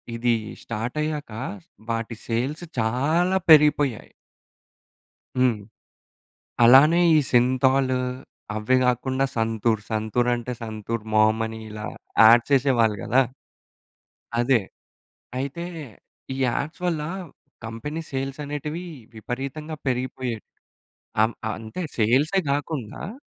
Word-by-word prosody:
ఇదీ 120 Hz, 0 st, +2 dB, 0.3 s
స్టార్ట్ 115 Hz, +5 st, -4 dB
అయ్యాకా, 150 Hz, -7 st, -4 dB, 0.5 s
వాటి 115 Hz, 0 st, -2 dB
సేల్స్ 130 Hz, +8 st, -2 dB, 0.2 s
చాలా 155 Hz, +12 st, +2 dB
పెరిగిపొయ్యాయి. 150 Hz, -5 st, +5 dB, 1.3 s
హ్మ్. 125 Hz, -3 st, +3 dB, 1.1 s
అలానే 140 Hz, +8 st, +7 dB, 0.2 s
ఈ -, -, +6 dB
సింథాలూ, 130 Hz, +1 st, +3 dB, 0.6 s
అవ్వే 110 Hz, +4 st, +2 dB
గాకుండా 130 Hz, +2 st, +1 dB
సంతూర్, 110 Hz, -1 st, +1 dB
సంతూర్ 110 Hz, +3 st, 0 dB
అంటే 120 Hz, +1 st, -4 dB
సంతూర్ 110 Hz, +1 st, -4 dB
మామ్ 110 Hz, +1 st, +4 dB
అని 110 Hz, 0 st, -7 dB
ఇలా 105 Hz, 0 st, -7 dB, 0.4 s
యాడ్ 115 Hz, +2 st, +8 dB
చేసేవాళ్ళు 125 Hz, -6 st, +3 dB
గదా! 130 Hz, +3 st, +3 dB, 1.2 s
అదే. 120 Hz, -1 st, +3 dB, 0.8 s
అయితే 140 Hz, +6 st, -4 dB, 0.7 s
ఈ -, -, -6 dB
యాడ్స్ 140 Hz, +7 st, -2 dB
వల్లా 155 Hz, -3 st, -1 dB, 0.5 s
కంపెనీ 115 Hz, +8 st, -5 dB
సేల్స్ 135 Hz, +1 st, -4 dB
అనేటివీ, 150 Hz, +4 st, -5 dB, 0.3 s
విపరీతంగా 135 Hz, +7 st, -5 dB
పెరిగిపోయేట్ 125 Hz, -2 st, -2 dB, 0.8 s
అమ్ 110 Hz, +2 st, +3 dB, 0.2 s
అంతే 110 Hz, -, -6 dB
సేల్సే 135 Hz, -, +3 dB
గాకుండా 145 Hz, -, -4 dB
125 Hz, 95 wpm, -24 LUFS, 115-145 Hz, 1.3 s, యాడ్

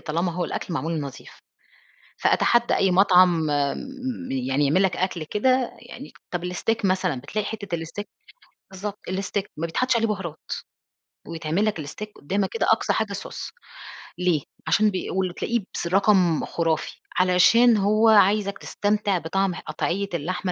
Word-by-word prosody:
طالما 170 Hz, +3 st, -1 dB
هو 180 Hz, +1 st, -2 dB
الأكل 170 Hz, -, -4 dB
معمول 160 Hz, +2 st, -2 dB
نضيف. 140 Hz, -2 st, -9 dB, 0.8 s
فأتحدّى 240 Hz, 0 st, +3 dB
أي 195 Hz, -, +3 dB
مطعم 180 Hz, -2 st, +5 dB
م 250 Hz, -, -3 dB
يعني 135 Hz, +2 st, 0 dB
يعمل 180 Hz, +8 st, +3 dB
لك 190 Hz, -, +1 dB
أكل 180 Hz, -3 st, -2 dB
كده 255 Hz, -, +1 dB
يعني -, -, -10 dB, 0.2 s
طب 180 Hz, -1 st, -3 dB
الsteak 225 Hz, +4 st, -1 dB
مثلًا، 185 Hz, -8 st, +1 dB
بتلاقي 205 Hz, +10 st, -3 dB
حتّة 200 Hz, -5 st, -4 dB
الsteak 165 Hz, +5 st, -6 dB, 0.7 s
بالضبط. 200 Hz, +2 st, -6 dB
الsteak 195 Hz, +1 st, -2 dB
ما 165 Hz, -, -2 dB
بيتحطّش 250 Hz, +10 st, 0 dB
عليه 225 Hz, 0 st, +1 dB
بُهارات. 180 Hz, -7 st, -5 dB, 0.8 s
ويتعمل 165 Hz, +4 st, -1 dB
لك 210 Hz, -7 st, -1 dB
الsteak 210 Hz, +9 st, -7 dB
قدامك 190 Hz, +6 st, -1 dB
كده 230 Hz, -, 0 dB
أقصى 220 Hz, -, +2 dB
حاجة 215 Hz, -2 st, -1 dB
صوص. 200 Hz, -, -6 dB, 0.7 s
ليه؟ 180 Hz, -4 st, +1 dB, 0.3 s
عشان 215 Hz, 0 st, +4 dB
بي 185 Hz, -, -4 dB
والللي 185 Hz, -2 st, -1 dB
تلاقيه 235 Hz, +4 st, -1 dB
بس 170 Hz, -, -3 dB
رقم 185 Hz, -3 st, +3 dB
خُرافي. 165 Hz, -2 st, -2 dB, 0.2 s
علشان 215 Hz, +6 st, +5 dB
هو 215 Hz, +3 st, +3 dB
عايزك 200 Hz, -1 st, +4 dB
تستمتع 205 Hz, -2 st, 0 dB
بطعم 185 Hz, +2 st, -1 dB
قطعيّة 200 Hz, +5 st, -3 dB
اللحمة 180 Hz, +3 st, -2 dB
190 Hz, 145 wpm, -24 LUFS, 170-210 Hz, 0.8 s, مطعم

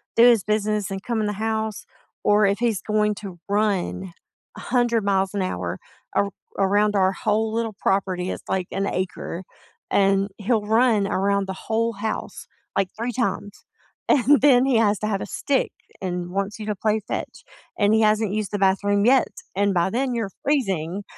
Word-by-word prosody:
do 230 Hz, -, +6 dB
his 235 Hz, -5 st, +6 dB
business 210 Hz, -1 st, 0 dB
and 195 Hz, 0 st, -5 dB
come 235 Hz, -2 st, -1 dB
in 210 Hz, -, 0 dB
the 210 Hz, -, -1 dB
house 220 Hz, 0 st, -2 dB, 0.4 s
or 210 Hz, 0 st, +4 dB
if 200 Hz, +1 st, +1 dB
he's 230 Hz, -5 st, 0 dB
going 210 Hz, 0 st, +1 dB
to 195 Hz, -4 st, -8 dB
run 200 Hz, -3 st, 0 dB, 0.5 s
100 240 Hz, -3 st, +1 dB
miles 195 Hz, -1 st, +1 dB
an 200 Hz, -, 0 dB
hour 90 Hz, -, -3 dB, 0.4 s
ar 200 Hz, 0 st, +1 dB, 0.3 s
around 205 Hz, +2 st, +2 dB
our 190 Hz, -1 st, +3 dB
whole 215 Hz, +2 st, 0 dB
little 225 Hz, -2 st, -2 dB
property- 185 Hz, -2 st, 0 dB
it's -, -, -6 dB
like 185 Hz, -2 st, -1 dB
an 195 Hz, +1 st, -1 dB
acre- 185 Hz, -1 st, -3 dB, 0.5 s
and 195 Hz, 0 st, +3 dB
he'll 215 Hz, 0 st, 0 dB
run 220 Hz, -1 st, +3 dB
around 200 Hz, 0 st, +1 dB
the 190 Hz, -, -3 dB
whole 230 Hz, +4 st, -1 dB
house, 215 Hz, +1 st, -5 dB, 0.3 s
like, 195 Hz, -1 st, +2 dB
3 235 Hz, +2 st, -2 dB
times, 205 Hz, -4 st, -3 dB, 0.4 s
and 280 Hz, 0 st, +5 dB
then 260 Hz, -3 st, +6 dB
he 265 Hz, -3 st, +3 dB
has 210 Hz, -2 st, +3 dB
to -, -, -3 dB
have 200 Hz, -2 st, -1 dB
a -, -, -3 dB
stick 275 Hz, +5 st, 0 dB, 0.3 s
and 180 Hz, -1 st, -3 dB
wants 200 Hz, +2 st, -2 dB
you 215 Hz, -, -5 dB
to 210 Hz, -1 st, -2 dB
play 215 Hz, +2 st, +1 dB
fetch, -, -, -5 dB, 0.4 s
and 205 Hz, 0 st, +4 dB
he 220 Hz, -, +4 dB
hasn't 215 Hz, -1 st, +2 dB
used 215 Hz, -1 st, -2 dB
the 205 Hz, -, -1 dB
bathroom 200 Hz, +1 st, +2 dB
yet, 260 Hz, +1 st, +5 dB, 0.3 s
and 200 Hz, 0 st, +2 dB
by 175 Hz, +1 st, +2 dB
then, 255 Hz, +3 st, 0 dB
you're 220 Hz, -4 st, -2 dB
freezing. 195 Hz, -, 0 dB
205 Hz, 180 wpm, -23 LUFS, 195-225 Hz, 0.5 s, do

